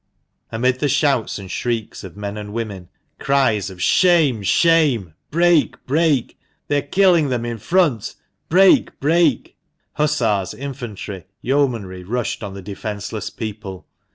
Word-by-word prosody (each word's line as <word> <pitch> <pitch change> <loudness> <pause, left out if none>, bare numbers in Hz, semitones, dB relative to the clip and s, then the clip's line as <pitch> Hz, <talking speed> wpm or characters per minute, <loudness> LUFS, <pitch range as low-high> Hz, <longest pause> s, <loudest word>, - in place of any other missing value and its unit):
Amid 125 +3 0
the 145 - 0
shouts 140 -3 +1
and 95 -2 -9
shrieks 115 -3 -3
of 95 0 -10
men 100 0 -5
and 105 -1 -7
women, 105 -6 -5 0.3
cries 130 -8 +1
of 90 -1 -6
"Shame! 160 - +3
shame!" 135 - +2 0.2
"Break! 170 0 +2
break!" 150 -2 +1 0.3
"They 145 - +2
are 145 - -8
killing 175 -5 +4
them 120 -2 -2
in 120 -1 -4
front! 155 - +1
" - - -50
" - - -50
Break! 190 +3 +4
break! 160 -2 +1 0.2
" - - -50
Hussars, 115 -11 +1
infantry, 120 -9 -7 0.2
yeomanry 115 -9 -1
rushed 120 +5 -3
on 100 -1 -6
the 100 - -9
defenceless 105 +1 -5
people. 105 -4 -7
120 Hz, 145 wpm, -20 LUFS, 105-145 Hz, 0.3 s, killing